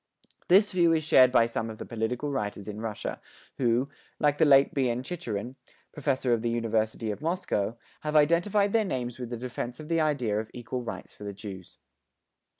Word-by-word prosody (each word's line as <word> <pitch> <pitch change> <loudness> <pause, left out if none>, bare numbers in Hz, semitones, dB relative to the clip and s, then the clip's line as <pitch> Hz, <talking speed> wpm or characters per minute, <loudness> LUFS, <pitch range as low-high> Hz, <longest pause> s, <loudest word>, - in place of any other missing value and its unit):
This 200 +4 +5
view 170 -2 +4
is 160 -1 +1
shared 130 -4 +6
by 115 -2 +5
some 115 -1 -3
of 110 - -8
the - - -7
political 120 +5 -2
writers 105 -5 -3
in 105 0 -6
Russia 110 -2 -4 0.4
who, 125 +1 +2 0.3
like 145 -1 +2
the - - +6
late 135 -1 +6
B.N. 125 -2 0
Chicherin, 130 - -5 0.4
Professor 135 -4 0
of 115 - +1
the 120 - 0
University 110 -1 -1
of 105 - -7
Moscow, 120 - -1 0.2
have 150 0 -3
identified 175 +7 +3
their 225 -1 +4
names 125 - -3
with 125 -2 -5
the 120 - -4
defence 125 0 -5
of 155 0 -9
the 165 -1 +2
idea 125 -9 +1
of 110 0 -5
equal 125 +1 -4
rights 120 - -7
for - - -12
the 100 -1 -5
Jews. 95 -3 -9
125 Hz, 190 wpm, -28 LUFS, 110-150 Hz, 0.4 s, shared